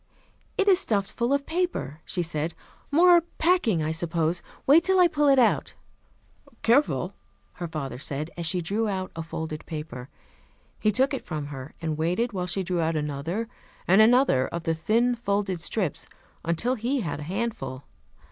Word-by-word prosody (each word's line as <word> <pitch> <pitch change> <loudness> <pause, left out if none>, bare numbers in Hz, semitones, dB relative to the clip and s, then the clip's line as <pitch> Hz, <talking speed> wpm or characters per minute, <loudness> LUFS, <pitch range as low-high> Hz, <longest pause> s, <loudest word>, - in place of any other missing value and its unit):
"It 400 - +2
is 380 -2 +6
stuffed 200 - 0
full 240 +2 -1
of 280 0 +1
paper," 320 - -2
she 175 - -2
said. 160 0 -3 0.3
"More 345 +3 +6 0.2
packing, 315 - +2
I 155 - -1
suppose. 165 +1 0 0.2
Wait 310 +5 +6
till 380 +1 +3
I 360 - +7
pull 295 -3 +1
it 275 -1 +6
out." 240 -3 +2 0.9
"Careful," 265 +6 +2 0.5
her 175 - -2
father 145 -5 -5
said, 150 +2 -3
as 170 -1 -2
she 180 +2 0
drew 205 +7 -1
out 190 -2 -3
a 165 - -4
folded 160 -1 -5
paper. 150 -5 -6 0.7
He 215 - +2
took 265 +7 +1
it 270 - -3
from 155 -4 -4
her, 135 +2 -8
and 155 -1 -2
waited 180 +9 0
while 180 -2 -2
she 190 +2 -1
drew 180 -1 -1
out 165 0 0
another 150 +9 -2 0.4
and 190 +4 +6
another 230 - +4
of 170 -1 -5
the 165 -1 +1
thin 225 +10 +2
folded 200 -6 -1
slips, 180 -1 -1 0.4
until 170 +10 0
he 255 +3 -1
had 165 -6 -3
a 150 +2 -7
handful. 200 - -3
185 Hz, 175 wpm, -26 LUFS, 160-245 Hz, 0.9 s, I